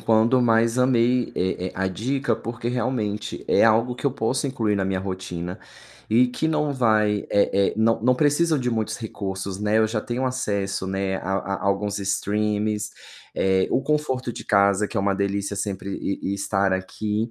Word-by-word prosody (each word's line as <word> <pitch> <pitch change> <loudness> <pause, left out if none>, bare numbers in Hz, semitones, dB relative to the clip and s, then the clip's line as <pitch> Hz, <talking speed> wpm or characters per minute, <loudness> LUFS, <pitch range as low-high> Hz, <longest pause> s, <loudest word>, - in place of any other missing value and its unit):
quando, 115 +3 +3
mas 115 +1 +3
amei, 125 -1 +2
eh 95 0 -1
eh, - - -12
a 95 +1 -1
dica 120 +6 -1
porque, 115 +1 -5
realmente, 120 -4 -2
é - - +4
algo 115 +2 +3
que 125 - -11
eu - - +3
posso 130 +2 -1
incluir 115 -6 0
na 95 - 0
minha 95 0 -1
rotina 90 -2 -5 0.5
e 120 +4 +5
que 160 +6 -1
não 150 -2 0
vai 110 -5 +2
eh 100 - +3 0.2
eh, - - -4
não 115 +1 +2
não 125 +2 +4
precisam 150 +2 +2
de 125 -2 -1
muitos 110 -2 -1
recursos, 100 -4 -5
né, 105 +1 +2
eu 110 - +4
já 110 0 -2
tenho 120 +4 -3
acesso, 100 -7 -2
né, 95 0 -1
a 95 - -5
a 100 0 -3
alguns 100 +1 0
streamings, 105 +1 -1 0.4
eh, 95 -1 +2
o - - +2
conforto 130 -5 -1
de - - -8
casa 100 0 +3
que - - -7
é - - +2
uma 100 0 +1
delícia 100 +1 -1
sempre 100 -1 -3
e 100 - -2
e - - 0
estar 100 -1 0
aqui. 105 +4 -2
105 Hz, 185 wpm, -24 LUFS, 100-120 Hz, 0.5 s, e